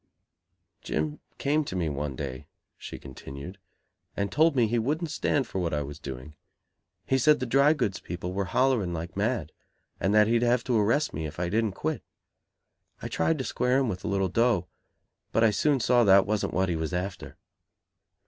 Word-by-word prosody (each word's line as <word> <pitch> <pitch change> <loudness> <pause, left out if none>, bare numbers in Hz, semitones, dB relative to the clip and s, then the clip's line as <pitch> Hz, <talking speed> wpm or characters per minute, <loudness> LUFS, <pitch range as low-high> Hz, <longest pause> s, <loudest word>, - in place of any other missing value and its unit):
"Jim 75 -1 -2 0.2
came 150 +2 +1
to 115 - -6
me 85 -3 0
one 75 -2 -3
day," 70 0 -6 0.3
she - - -8
continued, 70 +7 -9 0.6
"and 100 0 -1
told 160 0 +3
me 120 -3 +4
he 115 +2 0
wouldn't 155 +7 -1
stand 140 -2 0
for 95 - -4
what 85 -4 -1
I 75 - -1
was 70 +2 -8
doing. 65 0 -8 0.7
He 130 - +2
said 150 +3 +4
the 130 - -2
drygoods 135 -4 +2
people 90 +1 -5
were 100 0 -1
hollering 120 -4 +1
like 85 +2 -6
mad; 100 - -1 0.5
and 95 - +1
that 105 0 +7
he'd 115 +2 +2
have 120 0 +2
to 120 -4 +1
arrest 130 +9 +1
me 80 +1 -3
if 75 +3 -9
I 90 -1 -1
didn't 110 0 0
quit. 155 +8 -3 1.0
I - - -6
tried 165 - +1
to 130 - -3
square 125 0 +1
him 135 -3 +1
with 90 -3 -5
a - - -3
little 95 -1 +1
dough, 115 -1 +2 0.7
but 115 - +2
I 110 - +5
soon 145 +6 +2
saw 120 0 +4
that 95 -2 +6
wasn't 105 0 -1
what 95 +1 +2
he 85 - 0
was 80 +2 -3
after." 90 +2 -4
100 Hz, 190 wpm, -27 LUFS, 85-125 Hz, 1.0 s, that